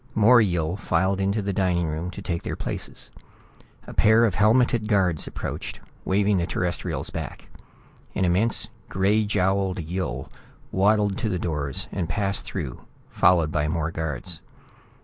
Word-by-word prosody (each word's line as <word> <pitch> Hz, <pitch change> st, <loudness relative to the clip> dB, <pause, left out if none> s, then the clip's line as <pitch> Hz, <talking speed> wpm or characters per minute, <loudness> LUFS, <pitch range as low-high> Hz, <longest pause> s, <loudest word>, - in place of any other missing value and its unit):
More 115 Hz, +2 st, +7 dB
Yill 85 Hz, -3 st, 0 dB
filed 95 Hz, +1 st, +1 dB
into 100 Hz, +2 st, 0 dB
the 100 Hz, 0 st, -1 dB
dining 90 Hz, -3 st, +1 dB
room 80 Hz, +3 st, -3 dB
to -, -, -8 dB
take 85 Hz, -2 st, -2 dB
their -, -, -4 dB
places. -, -, -5 dB, 0.7 s
A -, -, -9 dB
pair 110 Hz, +2 st, +5 dB
of 105 Hz, -, +1 dB
helmeted 110 Hz, +3 st, +3 dB
guards 95 Hz, -7 st, +2 dB
approached, -, -, -5 dB, 0.3 s
waving 100 Hz, 0 st, +2 dB
the 85 Hz, -, -1 dB
Terrestrials 90 Hz, +1 st, -2 dB
back. -, -, -6 dB, 0.7 s
An 95 Hz, -, +2 dB
immense 95 Hz, +8 st, +2 dB, 0.2 s
gray 105 Hz, +3 st, +2 dB
jowled 95 Hz, -1 st, +1 dB
Yill 85 Hz, -6 st, -4 dB, 0.4 s
waddled 100 Hz, 0 st, +2 dB
to 115 Hz, -, -1 dB
the 95 Hz, -, -1 dB
doors 75 Hz, -5 st, -2 dB
and 85 Hz, -4 st, -3 dB
passed 100 Hz, +3 st, -1 dB
through, 75 Hz, -11 st, -5 dB, 0.3 s
followed 85 Hz, -4 st, +4 dB
by 75 Hz, -1 st, 0 dB
more 80 Hz, 0 st, -1 dB
guards. 80 Hz, +1 st, -3 dB
95 Hz, 150 wpm, -25 LUFS, 85-105 Hz, 0.7 s, More